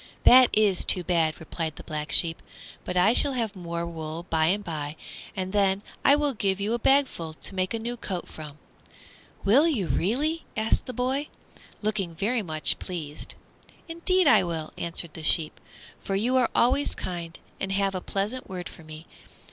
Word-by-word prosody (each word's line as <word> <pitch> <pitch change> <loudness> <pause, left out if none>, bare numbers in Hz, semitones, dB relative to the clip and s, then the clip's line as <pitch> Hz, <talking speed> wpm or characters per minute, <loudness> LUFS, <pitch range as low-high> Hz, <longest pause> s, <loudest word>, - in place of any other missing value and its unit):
"That 255 0 +8
is 210 -4 +3
too 180 - +5
bad," 165 -3 0
replied 160 -1 -5
the - - -10
Black 150 0 -5
Sheep; 165 -1 +5 0.4
"but 180 - -3
I 190 +6 +5
shall 280 +2 +5
have 225 -5 -2
more 170 -2 -4
wool 165 0 -6
by 160 -1 +2
and 200 +4 +1
by, 150 -3 -5 0.4
and 190 0 -4
then 200 -1 +2 0.2
I 280 - +6
will 290 -1 0
give 195 -3 0
you 205 +3 -1
a 240 - -1
bagful 255 - +1
to 195 - -6
make 185 -1 -1
a 230 - -1
new 235 +2 -4
coat 185 -5 -4
from." 150 -2 -10 0.9
"Will 265 +11 +5
you 250 - 0
really?" 290 - -1
asked 220 +1 0
the - - -3
boy, 260 +5 -1 0.6
looking 200 -6 -2
very 220 +7 0
much 155 -5 +2
pleased. 155 -5 -6 0.5
"Indeed 345 +2 +1
I 285 - +6
will," 165 -3 -4
answered 170 -1 -2
the 160 - -8
sheep, 155 0 +1 0.4
"for 195 - -2
you 235 +6 +1
are 255 -2 +3
always 265 +4 +2
kind 170 -2 -5 0.2
and 195 - -3
have 195 0 +1
a 185 - -4
pleasant 210 +8 -4
word 180 -2 -6
for 165 - -14
me. 155 +1 -11
190 Hz, 180 wpm, -26 LUFS, 165-235 Hz, 0.9 s, That